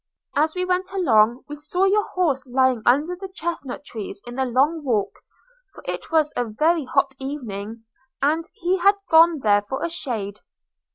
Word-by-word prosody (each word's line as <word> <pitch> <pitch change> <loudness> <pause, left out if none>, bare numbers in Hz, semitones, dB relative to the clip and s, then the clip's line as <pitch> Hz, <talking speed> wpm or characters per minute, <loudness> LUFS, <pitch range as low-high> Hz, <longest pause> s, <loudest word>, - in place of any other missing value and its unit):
As 310 +3 +2
we 365 0 -1
went 365 +1 -1
along, 240 - +3
we 295 - -7
saw 310 +5 -2
your 415 +2 +2
horse 300 -8 0
lying 260 -1 +2
under 295 +8 +3
the 385 +2 -7
chesnut 325 -7 -5
trees 215 -6 -7
in 240 - -8
the 265 +1 -1
long 280 +6 +1
walk; 225 -7 0 0.6
for - - -12
it - - -4
was 310 -2 +2
a 245 - +1
very 305 +8 +1
hot 275 +1 +1
evening, 230 -6 -6 0.4
and 305 +4 +1
he 375 -3 0
had 400 +3 +5 0.2
gone 325 -2 +6
there 205 -2 +4
for 265 +10 -3
shade. 220 - -4
285 Hz, 170 wpm, -23 LUFS, 245-340 Hz, 0.6 s, gone